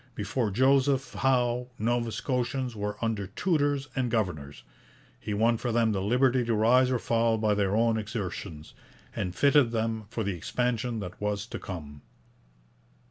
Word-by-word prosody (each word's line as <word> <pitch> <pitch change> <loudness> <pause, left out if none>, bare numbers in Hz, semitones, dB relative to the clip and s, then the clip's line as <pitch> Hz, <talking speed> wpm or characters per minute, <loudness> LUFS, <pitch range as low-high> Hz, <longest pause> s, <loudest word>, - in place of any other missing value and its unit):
Before 120 -5 -1
Joseph 135 +4 +2
Howe 125 -2 +1
Nova 120 +1 0
Scotians 125 0 -2
were 105 0 -3
under 105 -4 -2
tutors 145 - 0
and 130 -3 0
governors; 85 - -2 0.6
he - - -6
won 115 +2 +3
for 120 +1 -2
them 115 -1 +2
the 95 -2 -1
liberty 125 +4 +2
to 115 -1 0
rise 125 +4 +4
or 130 - +1
fall 115 -1 +1
by 110 -1 +2
their 100 -1 +1
own 115 0 +2
exertions, 95 -8 -6 0.4
and 90 -1 -3
fitted 140 -1 +4
them 110 -1 -2
for 115 -1 -3
the 100 -1 -1
expansion 120 +5 -2
that 90 0 -8
was 105 0 -1
to - - -7
come. 75 -6 -8
115 Hz, 155 wpm, -28 LUFS, 105-125 Hz, 0.6 s, rise